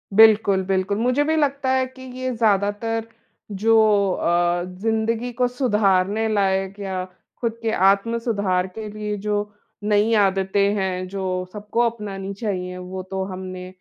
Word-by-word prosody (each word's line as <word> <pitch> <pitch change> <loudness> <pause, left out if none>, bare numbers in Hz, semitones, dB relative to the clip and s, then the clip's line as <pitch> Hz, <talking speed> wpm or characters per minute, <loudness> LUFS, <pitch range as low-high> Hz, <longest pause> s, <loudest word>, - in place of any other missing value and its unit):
बिल्कुल, 215 -3 +6
बिल्कुल। 190 +1 0
मुझे 250 +5 +2
भी 315 +1 +1
लगता 280 -3 0
है 260 0 +2
कि 260 0 -15 0.2
ये 255 0 -1
ज्यादातर, 220 +1 0 0.4
जो 220 +3 +3 0.3
अ, 175 0 +1
ज़िन्दगी 225 +5 -1
को 250 +1 +1
सुधारने 210 -4 +1
लायक 195 0 0
या 190 -2 -3 0.4
खुद 230 -1 -1
के 225 -1 0
आत्म-सुधार 200 -1 +1
के 220 -1 -5
लिए 210 0 -4
जो 210 0 -1 0.3
नई 210 +2 +2
आदतें 200 0 +2
हैं, 185 -2 -2
जो 185 -1 -3
सबको 210 +2 -4
अपनानी 200 -3 -6
चाहिए 185 -4 -4
वो 185 +1 -6
तो 190 0 -1
हमने 185 0 -7
205 Hz, 140 wpm, -22 LUFS, 190-225 Hz, 0.4 s, बिल्कुल